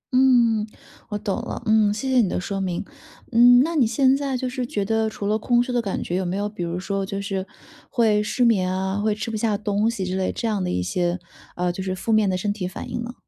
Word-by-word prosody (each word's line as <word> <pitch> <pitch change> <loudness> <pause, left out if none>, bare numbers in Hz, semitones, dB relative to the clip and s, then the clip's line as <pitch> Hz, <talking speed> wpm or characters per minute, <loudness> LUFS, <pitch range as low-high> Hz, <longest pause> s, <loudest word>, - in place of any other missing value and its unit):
嗯， 240 -4 +4 0.4
我 210 - -2
懂 210 +1 -2
了。 240 - -5
嗯， 215 -1 +4
谢 215 +6 -3
谢 260 - +3
你 200 - +1
的 - - -1
说 195 +1 -3
明。 180 0 -2 0.5
嗯， 245 +1 +7
那 330 +3 -2
你 265 -7 +4
现 260 +4 +3
在 275 -2 -2
就 255 +1 -2
是 255 0 -3
觉 205 -4 -2
得 220 +1 +1
除 205 - -6
了 215 +2 +1
空 240 +2 +2
虚 250 - -5
的 240 - +2
感 200 -4 -3
觉， 175 - -3
有 190 - 0
没 180 +1 -2
有 205 +1 -1
比 205 -4 -6
如 170 +1 -3
说 195 +1 -2
就 195 +1 -4
是 195 -1 -3 0.4
会 220 -4 +2
失 245 +4 +1
眠 190 -6 +2
啊， 190 +1 -1
会 210 0 +1
吃 215 +2 -4
不 - - -3
下 215 -1 0
东 205 +1 0
西 220 -5 -3
之 185 +1 -2
类 190 -1 0
这 230 - -3
样 210 -4 0
的 - - -2
一 90 0 -1
些， 175 - -1 0.4
呃， 180 0 0
就 185 - -6
是 185 0 -2
负 205 +5 -3
面 215 -2 +4
的 185 - 0
身 205 +2 -1
体 195 -3 -4
反 185 - -7
应 - - -3
呢？ 240 +1 -6
210 Hz, 285 characters per minute, -23 LUFS, 190-235 Hz, 0.5 s, 嗯